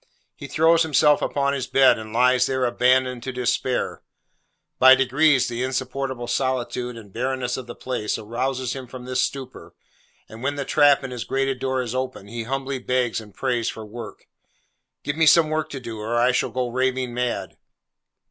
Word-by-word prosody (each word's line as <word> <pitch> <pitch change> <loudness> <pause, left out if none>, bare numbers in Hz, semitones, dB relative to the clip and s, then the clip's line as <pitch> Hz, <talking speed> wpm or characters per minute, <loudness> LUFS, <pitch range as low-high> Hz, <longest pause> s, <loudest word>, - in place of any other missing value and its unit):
He 140 - -9
throws 160 +3 +3
himself 150 -2 +4
upon 140 0 0
his 135 -3 -3
bed, 135 -4 +4
and 110 0 -9
lies 125 +2 +3
there 130 -1 0
abandoned 125 0 +2
to 130 - -4
despair. 125 0 -1 0.8
By 130 +1 +9
degrees 135 +1 +3
the 120 0 -4
insupportable 130 -1 -3
solitude 125 -1 -2
and 105 -4 -13
barrenness 125 0 -2
of 130 -2 -7
the 120 - -8
place 125 -5 -3
rouses 125 +3 -3
him 130 -2 -7
from 125 0 -10
this 130 0 0
stupor, 130 -2 -5 0.5
and 110 +1 -12
when 140 +2 -1
the 140 -1 -3
trap 145 -1 +4
in 135 - -5
his 120 -3 -4
grated 135 +4 -1
door 130 0 -1
is 120 -1 -5
opened, 130 -6 -4
he 115 -1 -5
humbly 135 +1 -3
begs 125 -2 -1
and 105 -1 -14
prays 120 -4 -1
for 110 - -7
work. 110 -1 -9 0.8
'Give 145 +1 -3
me 160 -1 +4
some 160 0 +6
work 155 0 -1
to 140 - -6
do, 115 -3 -7
or 115 +3 -2
I 120 +2 +4
shall 125 - 0
go 125 -1 -2
raving 130 0 -1
mad! 125 0 -3
130 Hz, 185 wpm, -23 LUFS, 120-135 Hz, 0.8 s, By